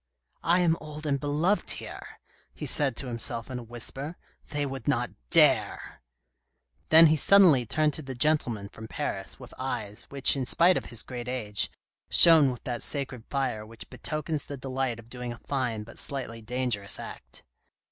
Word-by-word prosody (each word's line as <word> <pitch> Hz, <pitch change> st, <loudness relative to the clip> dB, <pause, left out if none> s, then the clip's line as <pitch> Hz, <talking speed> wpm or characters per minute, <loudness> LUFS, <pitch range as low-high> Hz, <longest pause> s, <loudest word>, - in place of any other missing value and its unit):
" -, -, -49 dB
I 175 Hz, +3 st, +3 dB
am 165 Hz, -2 st, +2 dB
old 155 Hz, 0 st, -8 dB
and 140 Hz, -2 st, 0 dB
beloved 155 Hz, +8 st, 0 dB
here," -, -, -9 dB, 0.4 s
he -, -, -6 dB
said 140 Hz, -5 st, +3 dB
to 135 Hz, -, -2 dB
himself 115 Hz, 0 st, -3 dB
in 125 Hz, -, -4 dB
a -, -, -8 dB
whisper, 135 Hz, +7 st, -6 dB, 0.2 s
" -, -, -34 dB
they 145 Hz, -1 st, -1 dB
would 135 Hz, -3 st, -6 dB
not -, -, 0 dB, 0.2 s
dare! -, -, +3 dB, 0.4 s
" 65 Hz, +3 st, -45 dB
Then 165 Hz, +1 st, +8 dB
he 155 Hz, 0 st, +5 dB
suddenly 160 Hz, -, +5 dB
turned 155 Hz, +4 st, +1 dB
to -, -, -4 dB
the 135 Hz, -3 st, -7 dB
gentleman 120 Hz, -7 st, +1 dB
from 110 Hz, +3 st, -11 dB
Paris, 95 Hz, -2 st, -4 dB
with 125 Hz, -2 st, -12 dB
eyes, 110 Hz, -6 st, -3 dB
which 140 Hz, 0 st, +3 dB
in 130 Hz, -3 st, -3 dB
spite 175 Hz, +6 st, +5 dB
of -, -, -2 dB
his 115 Hz, -2 st, -4 dB
great 120 Hz, -2 st, -7 dB
age, 110 Hz, -5 st, 0 dB, 0.4 s
shone 160 Hz, -5 st, +7 dB
with 125 Hz, -2 st, -6 dB
that 120 Hz, -3 st, -4 dB
sacred 135 Hz, -5 st, -1 dB
fire 130 Hz, -6 st, -2 dB
which 110 Hz, +1 st, -12 dB
betokens 155 Hz, -1 st, -4 dB
the 140 Hz, -, -7 dB
delight 130 Hz, -2 st, -3 dB
of 115 Hz, -1 st, -13 dB
doing 125 Hz, 0 st, -6 dB
a -, -, -12 dB
fine 120 Hz, -5 st, -3 dB
but 115 Hz, -, -12 dB
slightly 125 Hz, -5 st, -5 dB
dangerous 120 Hz, -3 st, -2 dB
act. -, -, -9 dB
130 Hz, 185 wpm, -27 LUFS, 115-150 Hz, 0.4 s, Then